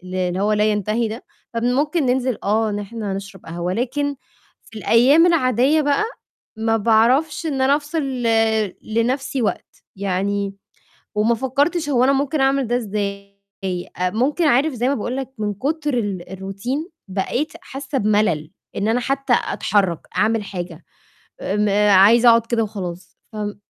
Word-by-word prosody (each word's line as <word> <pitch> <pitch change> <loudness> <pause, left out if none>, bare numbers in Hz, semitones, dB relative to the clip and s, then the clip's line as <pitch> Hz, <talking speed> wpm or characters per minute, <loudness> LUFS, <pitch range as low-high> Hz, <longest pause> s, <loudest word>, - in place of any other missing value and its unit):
اللي 185 0 -1
هو 210 +1 +2
لا 210 - +2
ينتهي 215 +3 0
ده، 220 +3 -7 0.3
فممكن 275 +7 +1
ننزل 255 -1 +1
آه 215 +2 +1
إن 205 0 -2
إحنا 205 -1 -5
نشرب 195 -1 -8
قهوة، 170 +2 -3
لكن 280 +6 -1 0.5
في 220 - -11
الأيام 260 +10 +5
العادية 280 -2 +3
بقى، 290 +7 +1 0.5
ما 225 0 +1
باعرفش 235 - +2
إن 280 -4 -1
أنا 270 +2 +4
أفصل 300 +2 -3
ل 255 -3 -2 0.6
لنفْسي 255 +4 -1
وقت، 220 - -3
يعني، 200 +1 -1 0.6
وما 220 +3 +2
فكّرتش 285 +6 0
هو 250 -3 +3
أنا 270 +2 +4
ممكن 280 +2 0
أعمل 270 -2 +2
ده 240 - +1
إزاي، 200 -3 -4 0.6
آآ 180 0 +1
ممكن 270 - 0
عارف 285 +2 +3
زي 245 +2 0
ما 280 - +1
باقول 245 +4 -3
لك 265 -1 -4
من 210 -1 -1
كتر 295 - -2
ال 195 -5 -3
الRoutine 195 - -4 0.2
بقيت 200 +11 -2
حاسّة 275 -4 -5
بملل، 205 -8 +1 0.2
إن 205 - -1
أنا 230 +2 +2
حتّى 275 0 0
أتحرّك، 190 -6 0
أعمل 220 0 +2
حاجة، 175 -4 -7 0.6
آمم 210 +2 0 0.2
عايزة 215 +5 +7
أقعد 230 0 +5
كده 230 -1 0
وخلاص، 185 -4 -7 0.2
فم 210 -1 -4
230 Hz, 150 wpm, -21 LUFS, 200-270 Hz, 0.6 s, عايزة